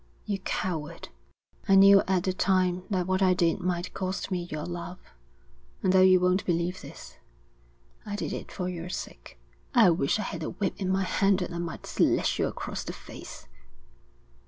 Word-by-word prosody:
You 200 -2 -2
coward!' 170 -3 -4 0.6
'I 195 - +7
knew 195 0 +8
at 185 -2 +1
the 185 - 0
time 185 -1 +1
that 185 -4 0
what 185 +1 0
I 185 -1 +4
did 170 0 +1
might 180 -1 -2
cost 190 0 -3
me 175 -1 -2
your 150 0 -4
love, 175 +1 -6 0.9
and 185 - +3
though 190 - +6
you 185 0 +6
won't 180 +2 +2
believe 175 +1 -1
this, - - -11 0.9
I 205 - -5
did - - -3
it - - -7
for 180 -2 -4
your 175 -1 -5
sake.' - - -7 0.4
'I 225 -7 +7
wish 160 -1 +1
I 215 - -2
had - - -5
a - - -3
whip 195 -3 -2
in 190 -2 -2
my 190 +1 +1
hand 195 +1 +2
that 175 -1 -4
I 170 - -4
might 170 -1 -5
slash - - +1
you - - +2
across - - -5
the - - -6
face.' - - -11
185 Hz, 185 wpm, -27 LUFS, 175-190 Hz, 0.9 s, knew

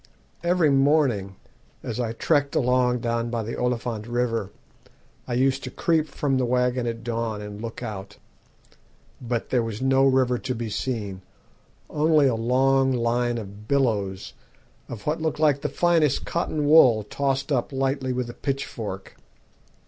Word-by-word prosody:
Every 170 -3 +3
morning, 135 -9 +2 0.5
as 115 - -4
I 115 -2 -1
trekked 145 +3 +1
along 125 -1 +2
down 115 0 -1
by 115 -1 -2
the 115 - -5
Oliphant 120 -3 -2
River, 120 -4 -1 0.8
I 120 - -2
used 135 +2 +1
to 130 - -4
creep 160 +3 +1
from 135 -3 -1
the 125 - +1
waggon 125 0 +1
at 115 0 -4
dawn 115 -2 -2
and 105 0 -8
look 115 +1 -6
out. 105 -3 -7 1.0
But 120 -2 -3
there 125 - +3
was 115 -2 -4
no 135 0 +3
river 130 -2 +2
to 130 -1 -3
be 115 -1 -4
seen 105 -5 -3 0.7
only 155 -1 +3
a 130 - +3
long 130 +3 +2
line 120 0 0
of 105 -1 -9
billows 105 -9 0 0.6
of 110 -4 -8
what 155 +2 -1
looked 160 -1 -2
like 145 -3 +3
the - - -2
finest 165 -5 +2
cotton 155 -3 -1
wool 130 -8 +6
tossed 135 +5 -2
up 125 -2 0
lightly 135 -1 -1
with 125 -1 -2
a 120 - -7
pitchfork. 115 -9 -5
125 Hz, 155 wpm, -24 LUFS, 115-135 Hz, 1.0 s, wool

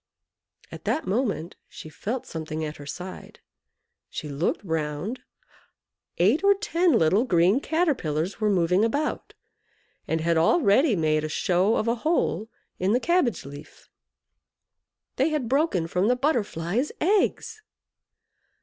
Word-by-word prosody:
At - - -10
that 315 - -1
moment 200 -5 -2
she - - -10
felt 225 +10 -5
something 155 -1 -5
at 150 0 -6
her 145 - -11
side. 180 +5 -8 0.7
She 150 - -6
looked 145 +9 -1
round 160 - -3 1.0
eight 220 - +3
or 400 0 +5
ten 365 -4 +1
little 195 +1 +3
green 185 0 +3
Caterpillars 250 - -1
were 215 - +2
moving 180 0 +2
about, 285 +7 -2 0.7
and 160 - 0
had 165 +1 +1
already 215 - +4
made 155 -2 +1
a 155 - -3
show 185 +7 +1
of 215 - -1
a 230 - +3
hole 310 -8 0 0.3
in 190 +3 +1
the 245 - +3
cabbage 320 - +1
leaf. 145 +1 -12 1.3
They 270 +5 +2
had 300 -6 -2
broken 265 - +1
from 180 +4 0
the 250 - +3
Butterfly's 240 - -1
eggs! 425 +4 0
205 Hz, 130 wpm, -25 LUFS, 165-275 Hz, 1.3 s, or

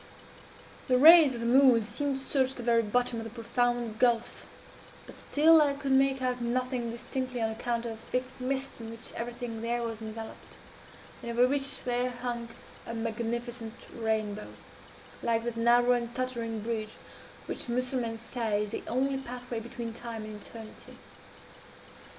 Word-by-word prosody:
"The 255 -2 +4
rays 310 -1 +9
of 235 - -5
the - - -2
moon 250 -2 +6
seemed 280 +5 -1
to 270 - -6
search 265 -1 +1
the 245 - -6
very 235 -1 +4
bottom 240 +2 0
of - - -4
the 225 - -6
profound 235 -1 -1
gulf; 240 -2 +1 0.6
but - - -12
still 315 +2 +5
I 285 -2 +2
could 280 -1 -3
make 265 0 +3
out 250 -1 -1
nothing 250 0 -1
distinctly, 255 +2 -4
on 225 -1 0
account 235 +1 -2
of 230 - -3
a - - -6
thick 250 +3 -2 0.2
mist 265 0 -3
in 225 - -7
which 230 0 -7
everything 235 -1 -5
there 235 +1 -1
was 225 -1 -4
enveloped, 220 0 -8 0.6
and 235 - -6
over 240 +2 +4
which 275 +1 -1
there 245 0 +1
hung 245 -1 -4 0.4
a 230 - -4
magnificent 230 +1 -3 0.2
rainbow, 215 -2 -1 0.7
like 230 -1 +1
that 240 -1 -3
narrow 240 +1 +4
and 240 -1 0
tottering 235 -4 -2
bridge 220 -1 -3 0.5
which - - -5
Mussulmans 245 -2 -1
say 225 -3 -1
is 210 - -6
the - - -3
only 270 +3 0
pathway 245 -2 -6
between 235 0 -6
Time 230 -1 -6
and 215 -1 -8
Eternity. 220 0 -11
240 Hz, 160 wpm, -29 LUFS, 230-255 Hz, 0.7 s, rays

